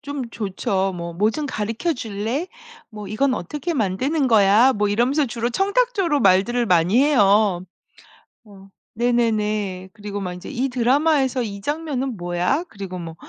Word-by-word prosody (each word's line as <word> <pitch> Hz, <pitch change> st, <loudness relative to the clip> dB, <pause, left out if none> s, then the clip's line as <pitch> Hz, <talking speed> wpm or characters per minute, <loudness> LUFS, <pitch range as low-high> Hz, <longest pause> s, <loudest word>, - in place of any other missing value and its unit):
좀 280 Hz, -4 st, -6 dB
좋죠. 195 Hz, -2 st, -2 dB
뭐 170 Hz, 0 st, -5 dB
"뭐 205 Hz, +5 st, +1 dB
좀 300 Hz, +6 st, -4 dB
가르쳐 225 Hz, +8 st, -2 dB
줄래? 230 Hz, -, -3 dB, 0.4 s
뭐 210 Hz, -3 st, -9 dB
이건 255 Hz, +5 st, +1 dB
어떻게 295 Hz, -, -4 dB
만드는 260 Hz, -, 0 dB
거야?" 220 Hz, +3 st, +5 dB
뭐 210 Hz, -2 st, 0 dB
이러면서 250 Hz, +8 st, +1 dB
주로 235 Hz, 0 st, -3 dB
청탁조로 390 Hz, -, +1 dB
말들을 200 Hz, +6 st, +3 dB
많이 180 Hz, +4 st, +3 dB
해요. 205 Hz, -9 st, +3 dB, 0.8 s
어 195 Hz, -3 st, -16 dB, 0.3 s
네네네. 215 Hz, -5 st, 0 dB
그리고 205 Hz, -2 st, -6 dB
막 180 Hz, -2 st, -4 dB
인제 180 Hz, -, -9 dB
"이 265 Hz, 0 st, -2 dB
드라마에서 265 Hz, +1 st, +2 dB
이 200 Hz, -3 st, -6 dB
장면은 275 Hz, -3 st, -3 dB
뭐야? 175 Hz, -, -1 dB
"그리고 195 Hz, -2 st, -7 dB
뭐 165 Hz, -2 st, -7 dB
225 Hz, 300 characters per minute, -21 LUFS, 195-270 Hz, 0.8 s, 거야